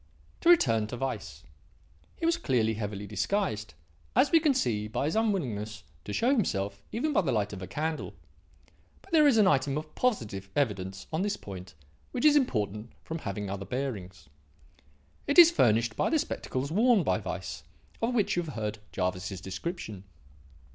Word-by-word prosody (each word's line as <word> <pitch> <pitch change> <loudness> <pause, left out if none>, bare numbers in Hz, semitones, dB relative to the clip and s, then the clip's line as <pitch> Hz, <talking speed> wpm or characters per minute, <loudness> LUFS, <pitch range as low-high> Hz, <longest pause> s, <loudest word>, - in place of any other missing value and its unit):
"To 335 - +2
return 115 - +5
to 120 - -6
Weiss. 100 - -4 0.7
He - - -3
was 335 +1 +3
clearly 120 - +1
heavily 105 -2 -4
disguised, 105 - -2 0.4
as - - +4
we 330 - +6
see 110 - 0
by 110 +5 -2
his 155 - -1
unwillingness 120 - -1 0.2
to - - -5
show 235 - +2
himself 100 - 0
even 295 +7 -1
by - - +4
the 175 - -1
light 105 -2 0
of 100 - -7
a 95 - -6
candle. 155 +1 -3 0.9
But 390 - -19
there 310 -3 +6
is 260 -5 +5
an 215 - +6
item 140 -5 +2
of 155 0 -6
positive 105 - -1
evidence 95 -8 -1
on 160 - 0
this 205 +1 -1
point 95 -3 -9 0.4
which 250 - -1
is 300 -1 +7
important 110 - 0
from 165 +1 -5
having 105 -4 -4
other 100 0 -4
bearings. 100 - -5 1.0
It 285 - +1
is 340 -1 +10
furnished 115 - +3
by - - +1
the 325 - +3
spectacles 140 - -3
worn 220 +1 +4
by - - +1
Weiss, - - -5 0.4
of 235 +2 0
which 210 -5 +2
you 175 - +1
have 160 -4 -7
heard 110 -1 -3
Jervis's 90 0 -2
description. 105 - -5
120 Hz, 170 wpm, -29 LUFS, -, 1.0 s, is